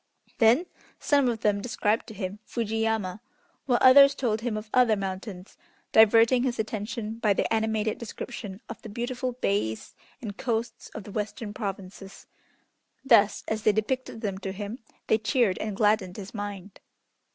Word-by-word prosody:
Then 240 +9 +5 0.3
some 280 -3 +3
of 230 -2 -3
them 205 -1 +1
described 225 -1 -1
to 220 - -10
him 195 +1 -5
Fuji 225 -2 -3
Yama, 220 -3 -1 0.5
while 245 -2 +3
others 275 +2 +8
told 225 -4 -1
him 230 -2 -2
of 215 +1 -6
other 245 -4 +5
mountains, 190 -1 -6 0.3
diverting 225 +3 +6
his 250 -2 -1
attention 220 +1 -4
by 210 -3 +3
their - - 0
animated 220 -1 0
description 210 -3 -7
of 230 - -9
the 220 - -9
beautiful 245 +3 -3
bays 195 - -2 0.3
and 215 -6 -6
coasts 230 -1 -3
of 220 - -6
the 205 - -10
Western 210 +1 -4
Provinces; 195 -2 -7 0.8
thus 215 -5 +4
as 220 0 -2
they 215 - +3
depicted 225 +2 -2
them 195 -4 -3
to 195 - -4
him, 205 +5 -6 0.3
they 220 - +2
cheered 215 -2 +1
and 210 -2 -4
gladdened 205 -4 +1
his 200 -2 -8
mind. 205 -2 -7
215 Hz, 160 wpm, -27 LUFS, 205-235 Hz, 0.8 s, others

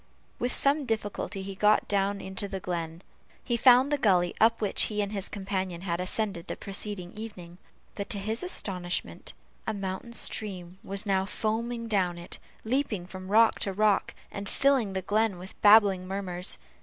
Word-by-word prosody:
With 245 - 0
some 280 +1 +2
difficulty 205 -3 -3
he 195 0 -5
got 210 +2 +3
down 200 0 0
into 190 +1 -4
the 195 -1 -5
glen: 170 -1 -4 0.4
he 240 - 0
found 255 +3 +6
the 290 - +1
gully 180 -7 +3
up 225 +1 +5
which 205 -3 +3
he 210 -1 -3
and 200 -1 -1
his 200 -2 -2
companion 190 -3 -3
had 175 -2 -2
ascended 190 -2 0
the - - -4
preceding 195 -2 -5
evening; 185 -5 -9 0.3
but 200 - -5
to - - +2
his 215 +3 -2
astonishment 180 - -3 0.3
a - - -1
mountain 195 +4 -5
stream 185 -5 -4
was 195 +1 0
now 190 -1 +1
foaming 230 +3 -2
down 185 -5 +1
it, 170 - -8 0.2
leaping 225 -6 -1
from 185 0 -9
rock 220 +3 +4
to 195 - -1
rock, 210 0 +2 0.2
and 200 0 -6
filling 265 -8 +2
the 190 -1 -2
glen 210 0 +1
with 185 +2 -10
babbling 205 -3 +6
murmurs. 185 -2 0
200 Hz, 170 wpm, -28 LUFS, 185-220 Hz, 0.4 s, found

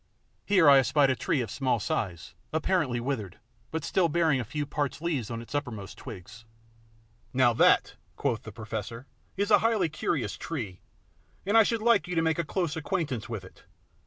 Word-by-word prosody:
Here 185 -6 +5
I 140 -1 +9
espied 135 +1 +3
a - - +1
tree 160 -3 0
of 115 - -4
small 130 -4 0
size, 90 -5 -3 0.2
apparently 160 -6 0
withered, 115 -7 -3 0.3
but 160 - -3
still 180 -3 +2
bearing 160 -4 +2
a - - -1
few 145 +6 -3
parched 145 0 -2
leaves 150 -9 -2
on 115 0 -5
its 120 - -12
uppermost 125 -9 -4
twigs. 115 -1 -10 0.9
"Now 125 -2 +4
that," 115 - +4 0.2
quoth 120 -6 -1
the 110 - -9
professor, 110 +2 -6 0.3
"is 200 +2 0
a 205 - +7
highly 220 -7 +2
curious 145 -7 -2
tree, 110 - -5 0.6
and 205 +3 +1
I 225 - +9
should 220 0 0
like 235 -5 +4
you 180 - -3
to 165 - +3
make 160 0 +1
a - - +2
close 170 0 -2
acquaintance 145 -8 -2
with 110 -5 -5
it. 95 - -16
140 Hz, 185 wpm, -28 LUFS, 115-165 Hz, 0.9 s, I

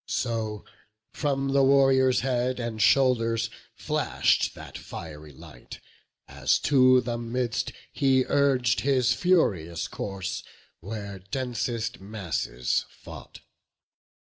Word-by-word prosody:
So 110 -4 -3 0.5
from 135 -2 -1
the 140 0 +3
warrior's 135 -1 +4
head 125 0 -1
and 115 -2 -4
shoulders 115 0 +3 0.2
flash'd - - 0
That - - -11
fiery 75 -2 -9
light, 75 -3 -13 0.5
as - - +1
to 130 -2 +5
the 120 -1 -3
midst 120 0 -2 0.2
he 130 -2 +2
urg'd 135 -6 +2
His 130 -3 +2
furious 95 - +1
course, 95 -2 -5 0.4
where 100 0 -7
densest 120 +2 -3
masses 90 - -2
fought. - - -12
120 Hz, 100 wpm, -26 LUFS, 100-130 Hz, 0.5 s, to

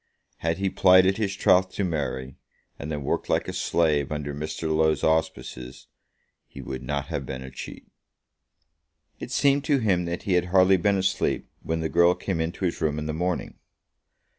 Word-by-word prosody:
Had 80 0 -1
he 95 -1 -1
plighted 95 0 +5
his 105 -3 -1
troth 95 0 +4
to 100 - -2
Mary, 70 -6 -3 0.4
and 75 +2 -5
then 75 -2 -3
worked - - -2
like - - +1
a - - -4
slave 75 -4 +1
under 75 -1 -3
Mr. 80 +2 -3
Low's 80 0 +2
auspices, 65 -5 -2 0.6
he - - -12
would 65 0 -6
not 70 -1 -3
have - - -3
been 65 -1 -6
a 65 - -9
cheat. - - -9 1.3
It - - -7
seemed 140 0 +2
to 145 -3 +3
him 95 -8 +1
that 85 0 -4
he 95 - 0
had 90 0 +2
hardly 95 +1 +4
been 100 +2 +2
asleep 95 0 -1
when 80 0 -2
the 80 - -1
girl 85 +2 +4
came 90 -4 -3
into 85 +4 -3
his 85 - -2
room 75 -2 0
in 75 - -4
the 75 - -3
morning. 90 +2 -3
80 Hz, 185 wpm, -25 LUFS, 75-95 Hz, 1.3 s, plighted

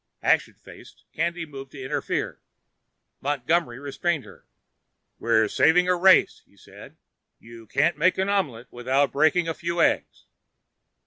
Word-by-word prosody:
Ashen - - +2
faced, - - -16
Candy 170 +1 -2
moved 135 -3 -11
to 140 - -10
interfere; 130 - -3 0.8
Montgomery 145 -1 -1
restrained 145 +3 -3
her. - - -17 0.7
"We're 110 -2 +2
saving 180 - +3
a 180 - +3
race," 185 +1 +4
he - - -28
said. - - -15 0.4
"You 115 -1 -14
can't 150 +6 +1
make 185 +4 +3
an 190 +1 0
omelet 145 - -2
without 130 +3 0
breaking 160 +4 +2
a 165 - -1
few 170 +1 -4
eggs." - - 0
150 Hz, 135 wpm, -24 LUFS, 130-175 Hz, 0.8 s, race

